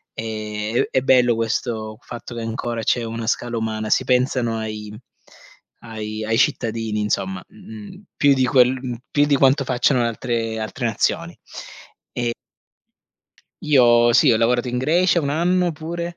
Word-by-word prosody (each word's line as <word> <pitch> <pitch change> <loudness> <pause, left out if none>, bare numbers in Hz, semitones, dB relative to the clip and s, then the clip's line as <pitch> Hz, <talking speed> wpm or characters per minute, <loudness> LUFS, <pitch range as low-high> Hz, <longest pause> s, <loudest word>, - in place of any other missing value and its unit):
è 110 0 -3
è 130 - +2
bello 125 -3 +4
questo 110 -1 -3
fatto 120 0 -9
che 115 - -5
ancora 115 0 -4
c'è 120 +2 +1
una 115 0 -5
scala 120 0 -1
umana. 110 -1 -3
Si - - +2
pensano 125 -2 +1
ai 105 -1 -6 0.9
ai 110 -1 -6
ai 115 +1 0
cittadini, 110 -3 0
insomma, 95 -3 -2
mhmm, - - -18 0.3
mhmm, 190 +2 -13
più 140 -1 +4
di 130 -1 +2
quel 125 -1 +4
mhmm, 130 -2 -5 0.2
più 145 0 +3
di 145 -1 +2
quanto 135 +1 +3
facciano 125 +1 +2
le 120 - +1
altre 115 -1 -3
altre 110 -2 -4
nazioni - - -1 0.8
e 120 -1 -2 1.3
Io 120 -5 +5
sì, 120 0 +5
ho - - +3
lavorato 120 +2 +1
in 125 0 -3
Grecia 170 +6 +2
1 140 - -2
anno 175 +3 +1
pure 170 +2 -6
120 Hz, 155 wpm, -21 LUFS, 110-130 Hz, 1.3 s, Io